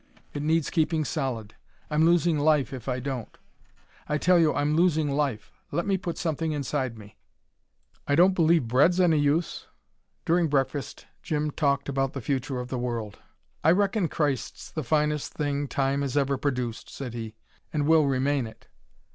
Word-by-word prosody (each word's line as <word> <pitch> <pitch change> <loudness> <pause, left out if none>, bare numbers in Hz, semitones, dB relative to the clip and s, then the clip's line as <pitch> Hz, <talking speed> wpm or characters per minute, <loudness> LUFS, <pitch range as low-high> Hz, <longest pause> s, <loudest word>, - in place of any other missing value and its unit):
It 145 - -3
needs 160 +1 +1
keeping 160 -1 +1
solid. 115 -6 -3 0.4
I'm 155 +1 +3
losing 170 -2 +3
life, 145 -4 +2
if 130 -1 -6
I 125 0 -1
don't. 130 -3 -5 0.7
I 150 - +1
tell 180 +3 +4
you 160 -2 +4
I'm 145 +1 0
losing 160 -4 +2
life. 140 -7 -1 0.2
Let 170 - -1
me 195 - +2
put 175 -3 -4
something 160 -1 -1
inside 135 -4 -2
me." 105 -1 -14 0.9
"I 145 - +2
don't 180 +4 +5
believe 165 -6 +3
bread's 145 +10 +4
any 165 -4 +4
use." 145 +3 0 0.6
During 170 0 +3
breakfast 135 -1 -2 0.2
Jim 150 -1 -1
talked 140 -2 0
about 135 -1 -1
the 140 - -4
future 130 +1 -2
of 125 0 -6
the 130 - -3
world. 115 -4 -4 0.4
"I 155 - +5
reckon 200 -1 +1
Christ's 145 -4 -2
the 155 - -3
finest 150 +2 0
thing 145 -1 -1
time 135 +1 0
has 140 0 -2
ever 140 -1 +2
produced," 125 -4 -3
said 130 -4 -7
he; 115 -2 -6 0.4
"and 150 -2 0
will 155 -1 +5
remain 135 -1 +1
it." 110 - -16
145 Hz, 170 wpm, -26 LUFS, 130-160 Hz, 0.9 s, don't